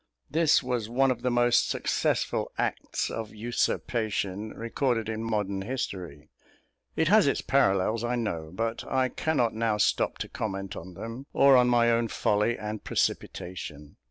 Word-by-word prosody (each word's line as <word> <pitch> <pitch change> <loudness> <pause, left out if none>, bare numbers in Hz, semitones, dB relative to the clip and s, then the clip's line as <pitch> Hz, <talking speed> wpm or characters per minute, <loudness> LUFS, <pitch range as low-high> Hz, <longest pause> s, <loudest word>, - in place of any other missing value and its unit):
This 155 -1 +4
was 125 -4 -2
one 135 +2 +3
of 120 -2 -3
the 125 - +1
most 120 0 +3
successful - - 0
acts - - -2
of 110 -1 -5
usurpation 110 -2 -1
recorded 115 +1 -1
in 110 0 -3
modern 105 -3 -1
history. 95 - -5 0.6
It 160 - +2
has 210 -4 +6
its - - +1
parallels, 110 -4 +2
I 120 +1 0
know; 85 -10 -3
but 115 +4 -2
I 130 -1 +2
cannot 125 -4 0
now 110 -1 0
stop 105 - +1
to - - -4
comment 95 -3 -4
on 95 -1 -9
them, 115 +7 -7
or 140 -1 +6
on 125 -1 +5
my 120 -1 +4
own 115 0 +2
folly 105 +2 +1
and 105 0 -5
precipitation. 75 -5 -3
115 Hz, 155 wpm, -28 LUFS, 105-125 Hz, 0.6 s, has